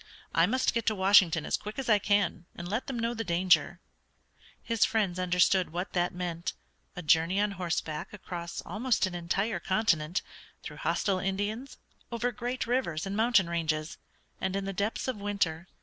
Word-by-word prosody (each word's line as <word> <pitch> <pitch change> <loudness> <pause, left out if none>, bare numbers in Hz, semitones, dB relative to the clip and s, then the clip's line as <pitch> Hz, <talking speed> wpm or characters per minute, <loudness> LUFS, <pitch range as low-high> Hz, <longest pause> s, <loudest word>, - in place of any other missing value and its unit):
"I 165 +1 +4
must 255 +5 +1
get 230 -1 -2
to 215 - +3
Washington 190 -5 +5
as - - 0
quick 210 +1 -8
as 270 - -3
I 215 -3 +5
can, 200 -4 +1
and 170 - -6
let 215 +7 -2
them 265 - -3
know 230 +1 0
the 225 -1 -3
danger." 180 -1 +2 0.8
His 230 -2 +1
friends 200 -5 +1
understood 180 0 +3
what 180 +3 -4
that 175 -1 +1
meant, 175 -1 -4 0.4
a 180 - -6
journey 165 +5 +3
on 210 0 +2
horseback 170 -4 -3
across 175 -4 -6
almost 235 0 +1
an 185 - -4
entire 175 +4 -1
continent, 185 -4 +1 0.4
through - - -8
hostile 195 -2 0
Indians, 205 +7 -3 0.3
over 235 +1 -1
great 245 +2 -3
rivers 230 -10 -1
and 195 +1 -3
mountain 220 -4 +4
ranges, 160 -2 -2 0.4
and 190 - -1
in 195 0 -2
the 195 - -3
depths 205 +7 -2
of 255 -4 -2
winter. 200 -5 -1
195 Hz, 175 wpm, -29 LUFS, 175-220 Hz, 0.8 s, Washington